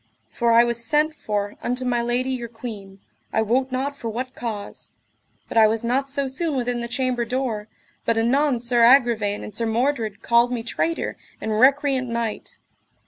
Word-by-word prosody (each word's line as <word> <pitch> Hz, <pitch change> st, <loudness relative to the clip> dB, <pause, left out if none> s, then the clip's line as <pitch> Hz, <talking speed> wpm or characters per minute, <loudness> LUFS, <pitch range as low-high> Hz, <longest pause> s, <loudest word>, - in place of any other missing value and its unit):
For 235 Hz, -1 st, +1 dB
I 230 Hz, +1 st, +7 dB
was 235 Hz, -1 st, -1 dB
sent 300 Hz, +6 st, +2 dB
for 205 Hz, -7 st, -3 dB
unto 250 Hz, +1 st, -2 dB
my 240 Hz, -1 st, +1 dB
lady 245 Hz, +2 st, 0 dB
your 245 Hz, -2 st, -3 dB
queen, 215 Hz, -4 st, -9 dB, 0.3 s
I 220 Hz, -, +2 dB
wot 255 Hz, +4 st, 0 dB
not 270 Hz, +2 st, -2 dB
for 235 Hz, -5 st, -5 dB
what 250 Hz, +3 st, -4 dB
cause; 220 Hz, -5 st, -6 dB, 0.5 s
but -, -, -4 dB
I 220 Hz, -, +7 dB
was 220 Hz, +1 st, 0 dB
not 265 Hz, +4 st, 0 dB
so 280 Hz, 0 st, -1 dB
soon 285 Hz, +4 st, -1 dB
within 245 Hz, -1 st, -1 dB
the 235 Hz, -, -4 dB
chamber 250 Hz, 0 st, -1 dB
door, 235 Hz, -3 st, -2 dB, 0.4 s
but 230 Hz, -, +1 dB
anon 255 Hz, +3 st, +2 dB
Sir 240 Hz, 0 st, +1 dB
Agravaine 230 Hz, -5 st, +4 dB
and 210 Hz, -, -8 dB
Sir 230 Hz, 0 st, 0 dB
Mordred 230 Hz, -2 st, -1 dB
called 235 Hz, +1 st, +3 dB
me 240 Hz, -2 st, -2 dB
traitor 330 Hz, +8 st, -2 dB, 0.2 s
and 215 Hz, -1 st, -2 dB
recreant 270 Hz, -1 st, +3 dB
knight. 230 Hz, -2 st, -4 dB
240 Hz, 180 wpm, -23 LUFS, 225-260 Hz, 0.5 s, I